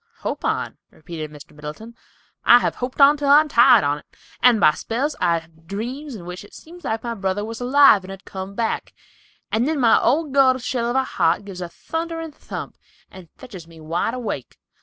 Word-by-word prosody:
"Hope - - -4
on," - - -2
repeated 155 -1 -8
Mr. 150 -1 -14
Middleton. 150 +10 -9 0.5
"I 240 - +8
have - - 0
hoped 250 +2 -5
on 285 +1 +7
till 285 -1 -1
I 285 +1 +8
am 310 - 0
tired 235 - +6
on't, 145 +1 -1 0.4
and 240 -2 +5
by 155 - +6
spells 255 - -3
I 170 -2 +3
have 165 0 -14
dreams 245 - -5
in 180 -5 -10
which 180 +2 -7
it 205 - -16
seems 345 +2 -14
like 220 0 -3
my 235 -1 -3
brother 195 -1 -2
was 225 +2 -7
alive 265 -5 +5
and 185 - -11
had 195 0 -10
come 190 +1 -7
back, 230 0 -3 0.6
and 230 +4 +1
then 310 -2 -1
my 235 -3 +5
old 300 -2 +1
gourd 260 -2 +4
shell 240 -2 -1
of 240 - -2
a 265 - +3
heart 205 - 0
gives 190 -3 -8
a 175 - -5
thunderin' 325 - -5
thump, - - -8 0.3
and 185 -3 -13
fetches 195 -10 -11
me 165 -1 -16
up 155 - -13
wide 170 +8 -1
awake. 220 - -5
225 Hz, 210 wpm, -21 LUFS, 180-265 Hz, 0.6 s, I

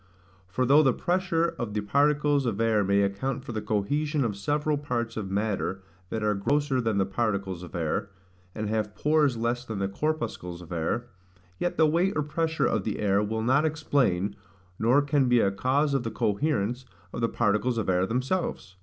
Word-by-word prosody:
For 115 +8 -1
though 140 +4 +6
the 135 -4 +3
pressure 175 0 0
of 110 -3 -4
the 105 - 0
particles 145 +4 +2
of 110 -3 -2
air 110 -2 +3
may 100 +1 +3
account 125 +7 -2
for - - -5
the 110 -2 -3
cohesion 145 +8 0
of 105 -3 -2
several 150 +8 0
parts 120 -5 -3
of 105 -3 -4
matter 100 -1 -2 0.3
that 110 -1 -3
are 105 0 +2
grosser 135 +6 +1
than 110 -3 0
the 95 - +2
particles 100 -3 -2
of 90 - -9
air, 85 +3 -1 0.5
and 110 0 -3
have 105 -1 -2
pores 150 -4 +2
less 120 +2 -1
than 110 -4 -5
the 95 0 0
corpuscles 100 - -3
of 85 - -14
air, 85 +8 -1 0.5
yet 175 - -1
the 160 - +5
weight 170 +6 +2
or 150 - +1
pressure 160 +2 0
of 110 - +1
the 105 - -2
air 100 -1 +2
will 110 +1 -2
not 130 +5 +3
explain, 130 - +1 0.4
nor 125 +6 +4
can 145 -3 +2
be 125 -1 +5
a 100 - +3
cause 140 +8 +1
of 135 - +2
the 115 - -3
coherence 120 +1 0 0.3
of - - -4
the 115 - +2
particles 115 +2 +1
of 110 - -1
air 90 0 +2
themselves. 125 - -2
115 Hz, 195 wpm, -27 LUFS, 100-145 Hz, 0.5 s, though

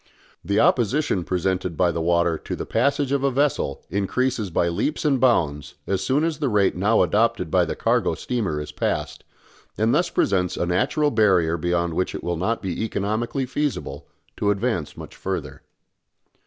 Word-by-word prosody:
The 100 +4 +1
opposition 120 - +2
presented 90 -1 -1
by 90 -2 +3
the 85 - -3
water 85 0 +2
to - - -5
the - - -5
passage 140 +3 +1
of 140 -1 +1
a 140 - +3
vessel 135 - 0
increases 105 +3 -1
by 85 0 +1
leaps 145 - -1
and 140 -3 +3
bounds 75 - +1
as 95 -1 -1
soon 140 +7 +1
as 160 -2 -1
the 145 -3 0
rate 105 -3 +2
now - - +3
adopted - - +1
by - - +3
the - - -4
cargo - - +1
steamer 105 -12 -2
is 75 0 -6
passed, - - -3 0.5
and 110 +2 +2
thus 175 +4 +2
presents 90 -3 0
a - - 0
natural 145 - +1
barrier 95 -7 +3
beyond 85 0 -1
which 90 +3 -1
it - - -6
will 85 - -1
not 105 +8 -1
be 95 +2 -2
economically 110 +5 -2
feasible 125 - -3 0.3
to 100 - 0
advance 105 -5 -1
much - - -10
further. - - -5
100 Hz, 175 wpm, -23 LUFS, 85-130 Hz, 0.5 s, by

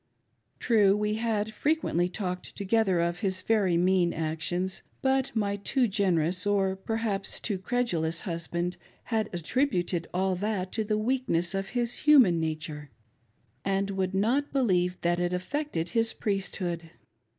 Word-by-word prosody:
True, 210 -4 +4
we 210 0 0
had 220 -2 -1
frequently 215 - +1
talked 180 -1 -4
together 200 -2 +1
of 170 +1 0
his 190 -3 0
very 200 -6 +2
mean 180 -1 +3
actions; 165 +4 -2 0.2
but 265 0 +2
my 200 -2 0
too 245 +5 +1
generous, 185 -3 +1
or 195 -2 +2
perhaps 205 0 -2
too 200 -4 -2
credulous, 180 -8 0
husband 170 0 -3 0.4
had 220 -1 +1
attributed 175 - 0
all 190 +1 0
that 195 -2 -2
to 220 - -1
the 210 0 0
weakness 215 -7 0
of 195 0 -2
his 240 -1 0
human 255 - +5
nature, 155 -2 -4 0.7
and 195 0 0
would 190 -1 -1
not 245 +9 +1
believe 185 -9 +1
that 175 0 +1
it 175 0 0
affected 180 - -2
his 225 +3 +1
priesthood. 180 -4 -2
195 Hz, 140 wpm, -28 LUFS, 175-220 Hz, 0.7 s, human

